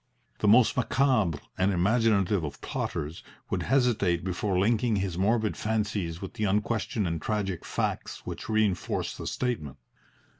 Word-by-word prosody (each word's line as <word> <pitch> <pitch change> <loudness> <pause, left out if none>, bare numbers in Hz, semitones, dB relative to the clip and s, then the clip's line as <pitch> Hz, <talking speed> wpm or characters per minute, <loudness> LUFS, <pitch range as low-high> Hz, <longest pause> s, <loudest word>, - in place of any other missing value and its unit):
The 105 - +1
most 115 +3 +6
macabre 125 - +2 0.2
and 95 +2 +3
imaginative 100 -1 +2
of 75 -2 -5
plotters 75 +3 -4 0.3
would - - 0
hesitate 110 -10 +2
before 95 +1 -1
linking 110 +3 +2
his 95 -3 -1
morbid 110 +4 +1
fancies 105 -6 -2
with 95 - -6
the 110 -3 -1
unquestioned 105 +1 0
and 85 -1 -2
tragic 100 -3 -2
facts - - -3
which - - -6
reinforce 110 -5 0
the - - -6
statement. 90 - -2
105 Hz, 140 wpm, -28 LUFS, 90-110 Hz, 0.3 s, most